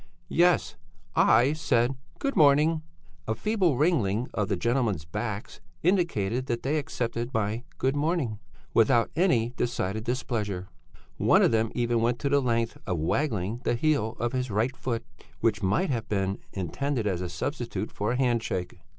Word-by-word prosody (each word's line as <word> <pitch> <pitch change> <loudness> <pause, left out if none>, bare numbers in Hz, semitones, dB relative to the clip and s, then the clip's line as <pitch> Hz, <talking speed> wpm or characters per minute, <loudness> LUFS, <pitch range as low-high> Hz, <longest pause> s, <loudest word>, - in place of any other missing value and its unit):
"Yes. 175 -1 +3 0.4
I 120 +6 +5
said 125 -5 +1 0.2
'good 275 0 -2
morning.' 155 0 +5 0.5
A 110 - 0
feeble 185 - +1
wriggling 125 - +1
of 105 0 0
the 100 - 0
gentlemen's 115 - 0
backs 105 +5 -5 0.2
indicated 130 - +1
that 120 -1 -2
they 150 +3 +1
accepted 120 -3 -3
my 110 +2 -1
good 135 +2 +1
morning 145 - 0 0.3
without 115 +1 +4
any 145 -10 +3
decided 110 -3 -1
displeasure; 110 -6 -2 0.5
one - - +4
of - - +4
them 110 0 +1
even 120 -1 +1
went 120 +1 +1
to 140 - 0
the 140 0 +3
length 115 -2 0
of 90 -3 0
waggling 110 - -1
the - - +1
heel 120 -4 +1
of 120 +1 -1
his 130 -1 -1
right 110 +6 0
foot, 120 -4 -3 0.3
which 110 -1 +1
might 140 - +1
have 115 -4 -3
been 95 -1 -1
intended 115 - -2
as 95 -4 0
a 90 - -3
substitute 110 - -3
for 105 +4 -1
a - - -1
handshake. 115 -9 -1
120 Hz, 160 wpm, -27 LUFS, 105-140 Hz, 0.5 s, I